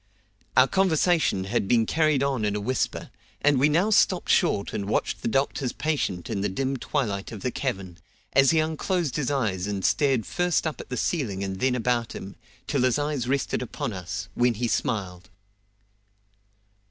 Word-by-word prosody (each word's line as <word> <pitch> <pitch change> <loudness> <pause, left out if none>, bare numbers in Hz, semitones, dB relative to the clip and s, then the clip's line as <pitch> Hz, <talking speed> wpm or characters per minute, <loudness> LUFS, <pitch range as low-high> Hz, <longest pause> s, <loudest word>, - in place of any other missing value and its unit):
Our 130 +1 +7
conversation 175 - +2
had 95 +1 -1
been 115 0 +3
carried 155 0 +2
on 135 -5 0
in 105 -1 0
a - - -1
whisper, 125 +5 -2 0.3
and 145 -2 +3
we 145 +3 +4
now 175 +8 +2
stopped 185 -3 +3
short 100 - +2
and 100 0 -3
watched - - -1
the - - -2
doctor's 135 +1 0
patient 135 - -2
in 105 -4 -2
the 105 - 0
dim 135 +7 -2
twilight 110 -8 -2
of 110 -4 -7
the 125 - -1
cavern, 95 -11 -4 0.3
as 135 -1 +5
he 165 - +3
unclosed 160 0 0
his 145 -3 -1
eyes 105 -9 -1
and 100 -2 -2
stared 135 -6 +2
first 175 -1 0
up 155 - -3
at - - -13
the 125 - -3
ceiling 110 - -1
and 95 -1 -4
then 130 +2 +2
about 120 -1 0
him, 95 +1 -8 0.3
till 140 -3 0
his 125 0 +3
eyes 145 -4 -2
rested 135 0 0
upon 120 -2 -4
us, 95 +2 -5
when 120 +1 +2
he 120 +3 -1
smiled. 95 -5 -2
125 Hz, 180 wpm, -26 LUFS, 100-145 Hz, 0.3 s, Our